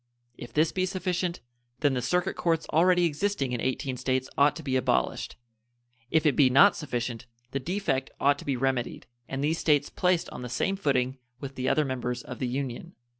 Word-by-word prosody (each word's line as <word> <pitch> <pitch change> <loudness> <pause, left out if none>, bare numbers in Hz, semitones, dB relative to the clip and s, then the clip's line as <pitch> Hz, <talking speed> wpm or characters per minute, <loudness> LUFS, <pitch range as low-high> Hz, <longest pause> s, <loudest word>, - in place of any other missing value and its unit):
If 120 -1 -9
this 155 +4 +2
be 185 0 0
sufficient, 180 -1 -2 0.4
then 145 -3 +3
the 125 - -1
circuit 180 +9 0
courts 165 -2 0
already 175 +2 +4
existing 160 -4 -1
in 120 - -2
18 130 0 -2
States 130 +1 -1
ought 145 +1 +4
to 160 - -8
be 135 -2 -1
abolished; 130 - 0 0.7
if 160 +2 +2
it 145 -4 +4
be 135 -3 +5
not 170 +11 +6
sufficient, 120 -4 -4 0.2
the 135 - -1
defect 140 -4 -1
ought 140 0 +3
to - - -10
be 135 -3 0
remedied, 130 -1 -1 0.2
and 135 +1 -3
these 160 +3 +1
States 145 -2 +2
placed 180 -2 +1
on - - -7
the 125 - -6
same 195 +10 0
footing 135 -7 0 0.2
with 135 0 -6
the 130 -1 -1
other 155 - +2
members 125 -2 -3
of - - -8
the 130 - -1
Union. 135 +6 -4
140 Hz, 195 wpm, -27 LUFS, 130-170 Hz, 0.7 s, not